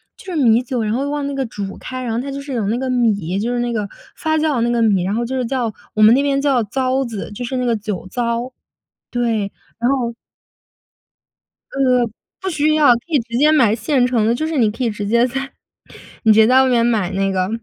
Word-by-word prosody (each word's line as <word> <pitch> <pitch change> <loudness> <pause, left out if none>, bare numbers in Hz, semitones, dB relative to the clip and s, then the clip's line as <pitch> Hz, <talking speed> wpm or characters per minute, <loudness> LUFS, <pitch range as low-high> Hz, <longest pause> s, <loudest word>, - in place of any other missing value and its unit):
就 - - -16
是 - - -3
米 235 -4 +4
酒， 250 -1 -2
然 215 0 -1
后 275 +4 -1
往 290 -1 -2
那 280 - -3
个 275 -1 -1
煮 200 -3 -6
开， 255 0 -6
然 235 -2 -2
后 230 - -1
它 275 +2 -5
就 275 - -5
是 280 -1 -7
有 225 -5 -1
那 225 +3 0
个 260 +1 -3
米， 205 -8 0
就 230 +4 -1
是 245 - -1
那 240 0 -1
个 210 -3 -2 0.3
发 315 0 0
酵 310 -2 +1
的 240 - 0
那 235 - +1
个 240 -1 +1
米， 200 -5 +2
然 190 +3 -1
后 235 +1 -1
就 260 +3 -4
是 255 - 0
叫 235 -3 -2 0.2
我 215 - +1
们 215 +2 +8
那 275 - +3
边 280 -1 +1
叫 275 -3 +2
糟 260 +5 0
子， 225 -6 -6
就 225 - -6
是 255 +2 -3
那 250 - -1
个 235 -1 +2
酒 210 -4 -5
糟。 235 +3 -2 0.6
对， 225 -4 0 0.3
然 235 +1 +1
后 255 -3 0 1.6
呃， - - -8 0.6
不 380 - -3
需 305 -1 +1
要， 300 -5 +6
可 235 - -4
以 310 -4 +2
直 235 +1 -4
接 300 +3 +5
买 235 -9 +4
现 245 +3 +1
成 235 -4 +1
的， 230 - +2
就 310 +6 -2
是 320 -2 -2
你 220 -4 +3
可 230 +4 -4
以 235 - +1
直 210 -1 -5
接 235 +3 +3
在 270 +2 -5 0.7
你 220 - +6
直 215 - +3
接 220 - +6
在 260 +3 +5
外 265 - +2
面 240 -2 +3
买 215 -6 +1
那 195 +1 0
个 185 -1 0
240 Hz, 270 characters per minute, -19 LUFS, 220-265 Hz, 1.6 s, 们